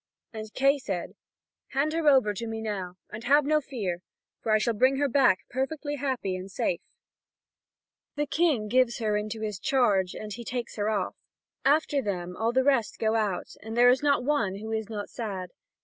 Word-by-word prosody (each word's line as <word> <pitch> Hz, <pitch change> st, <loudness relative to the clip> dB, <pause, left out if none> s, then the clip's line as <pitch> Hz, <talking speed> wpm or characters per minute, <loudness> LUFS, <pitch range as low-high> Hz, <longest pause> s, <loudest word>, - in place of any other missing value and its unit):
And 215 Hz, -1 st, -7 dB
Kay 275 Hz, +2 st, +4 dB
said: 190 Hz, -9 st, -4 dB, 0.6 s
"Hand 285 Hz, +3 st, +1 dB
her 325 Hz, -1 st, 0 dB
over 260 Hz, -7 st, +4 dB
to 230 Hz, +4 st, -5 dB
me 225 Hz, 0 st, -4 dB
now, 195 Hz, -5 st, -4 dB, 0.2 s
and 215 Hz, +2 st, -7 dB
have 285 Hz, +3 st, +5 dB
no 305 Hz, +1 st, +3 dB
fear, 205 Hz, -11 st, -4 dB, 0.4 s
for 220 Hz, -, -1 dB
I 215 Hz, -, +6 dB
shall 230 Hz, +2 st, +1 dB
bring 260 Hz, +5 st, +3 dB
her 285 Hz, +1 st, +2 dB
back 260 Hz, -8 st, +4 dB
perfectly 290 Hz, +3 st, -2 dB
happy 260 Hz, -9 st, -1 dB
and 185 Hz, +1 st, -6 dB
safe." 180 Hz, -2 st, -1 dB, 1.3 s
The 295 Hz, 0 st, 0 dB
King 295 Hz, -9 st, +1 dB
gives 250 Hz, +1 st, +3 dB
her 215 Hz, -3 st, 0 dB
into 215 Hz, +1 st, -3 dB
his 210 Hz, -3 st, -3 dB
charge, 205 Hz, -10 st, +2 dB
and 210 Hz, -1 st, -6 dB
he 235 Hz, -, -7 dB
takes 240 Hz, +1 st, -4 dB
her 210 Hz, +1 st, 0 dB
off. 205 Hz, -4 st, -1 dB, 0.5 s
After 290 Hz, 0 st, +3 dB
them 180 Hz, -5 st, -3 dB
all 225 Hz, +3 st, 0 dB
the 260 Hz, +2 st, +3 dB
rest 265 Hz, -5 st, +2 dB
go 220 Hz, 0 st, +1 dB
out, 210 Hz, -5 st, -1 dB
and 225 Hz, +2 st, -6 dB
there 245 Hz, +1 st, +7 dB
is 255 Hz, +2 st, +4 dB
not 285 Hz, -3 st, +2 dB
one 250 Hz, -9 st, +1 dB
who 220 Hz, +2 st, -6 dB
is 220 Hz, -1 st, -2 dB
not 205 Hz, -2 st, -4 dB
sad. 195 Hz, -6 st, -5 dB
225 Hz, 195 wpm, -28 LUFS, 210-270 Hz, 1.3 s, there